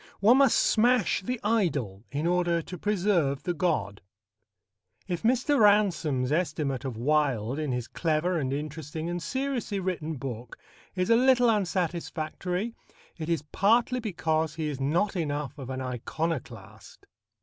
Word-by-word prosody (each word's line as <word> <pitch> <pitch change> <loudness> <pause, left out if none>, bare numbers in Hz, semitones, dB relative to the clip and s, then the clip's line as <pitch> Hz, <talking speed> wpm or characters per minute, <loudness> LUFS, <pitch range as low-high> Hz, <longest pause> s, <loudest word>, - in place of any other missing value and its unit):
One 225 +6 +6
must 275 -3 +5
smash 240 -2 +3
the 250 +6 -3
idol 145 - 0
in 145 +3 -3
order 175 -1 +1
to 180 - -8
preserve 175 -9 +1
the 175 - -1
god. 105 - -1 1.1
If 175 -3 -3
Mr. 255 +5 +2
Ransome's 180 - +3
estimate 150 -5 -1
of 130 -5 -4
Wilde 135 -2 +1
in 150 -3 -2
his 125 -1 -2
clever 165 +2 0
and 130 -3 -2
interesting 155 +3 -4
and 175 0 -3
seriously 255 - -2
written 170 -4 -3
book 125 -3 -7 0.4
is 185 +3 0
a - - +7
little 245 -1 +5
unsatisfactory, 180 +1 -2 0.5
it 160 0 -4
is 165 -3 0
partly 235 +5 +3
because 160 -7 -1
he 160 -2 -2
is 140 -2 -5
not 170 +9 +1
enough 145 -4 -2
of 130 -2 -7
an 130 0 -4
iconoclast. 125 -3 -5
165 Hz, 140 wpm, -27 LUFS, 140-200 Hz, 1.1 s, a